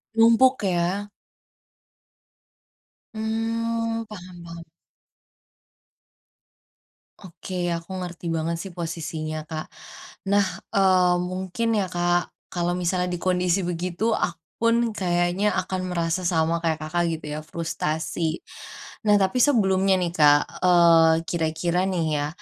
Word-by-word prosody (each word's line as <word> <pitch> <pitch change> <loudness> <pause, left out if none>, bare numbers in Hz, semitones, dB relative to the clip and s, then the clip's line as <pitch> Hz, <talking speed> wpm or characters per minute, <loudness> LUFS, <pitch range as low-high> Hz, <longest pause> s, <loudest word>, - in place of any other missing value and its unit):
Numpuk, 230 +3 +5
ya? 185 +3 0 2.1
Mmm, 230 +1 -2
paham 180 -4 -11
paham. 170 0 -9 2.6
Oke, 185 +1 -8 0.2
aku 170 +2 -8
ngerti 175 -1 -7
banget 165 +1 -1
sih 190 - -8
posisinya 160 -2 -4
Kak. 155 -1 -4 0.7
Nah, 200 -1 +4 0.3
eee, 185 -2 +4 0.2
mungkin 190 +5 -3
ya 190 - 0
Kak, 175 0 +2 0.3
kalau 175 0 0
misalnya 180 +1 0
di - - -7
kondisi 180 0 +2
begitu, 175 +2 -3
aku 165 -1 -2 0.2
pun 230 0 +4 0.2
kayaknya 175 +3 +1
akan 185 0 -2
merasa 170 +1 -1
sama 165 -2 +1
kayak 160 -1 0
Kakak 175 +3 -1
gitu 160 0 -5
ya, - - -4
frustasi. 160 0 -2 0.6
Nah, 205 - +6
tapi 245 +7 +1
sebelumnya 195 -7 +3
nih 170 -1 -1
Kak, 145 -1 +6 0.2
eee, 170 -2 +6 0.2
kira-kira 170 +1 -1
nih 175 -3 0
ya, 145 0 -1
175 Hz, 110 wpm, -24 LUFS, 165-195 Hz, 2.6 s, Nah